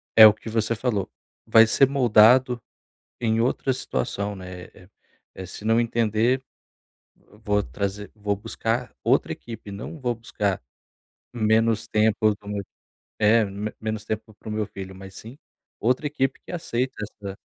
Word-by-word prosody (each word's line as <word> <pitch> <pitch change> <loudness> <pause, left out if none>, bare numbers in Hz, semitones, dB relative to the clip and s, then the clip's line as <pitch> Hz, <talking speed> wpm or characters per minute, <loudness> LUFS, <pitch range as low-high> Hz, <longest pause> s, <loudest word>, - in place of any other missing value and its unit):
é 110 - +11
o 105 - +9
que 110 - -9
você 110 +1 0
falou, 110 -4 -1 0.4
vai 115 0 +7
ser 135 +4 +4
moldado 125 -1 +5 0.6
em 115 -1 +1
outra 130 +2 +1
situação, 100 - -3
né, 90 -1 -9
eh 90 - -17 0.5
eh, 95 - -7
se 105 - -10
não 115 +1 +4
entender 115 +2 +1 1.0
vou 105 -2 +2
trazer 100 +1 -4
vou 105 -1 -2
buscar 115 +3 -3
outra - - +2
equipe 115 -3 -9
não 105 +10 -7
vou 125 -3 -1
buscar 105 - -2 0.7
menos 110 0 +2
tempo 110 0 +2
do - - -28 0.8
é, 110 +2 +5
me 100 +2 -5
menos 110 -1 -3
tempo 110 0 -4
pro 110 - -10
meu 105 0 -1
filho, 95 -1 -9
mas 95 0 -11
sim, 115 +6 -11 0.4
outra 130 +6 +1
equipe 135 -2 -1
que - - -9
aceita 130 -6 -2
essa. 100 -2 -8
110 Hz, 145 wpm, -24 LUFS, 105-120 Hz, 1.0 s, é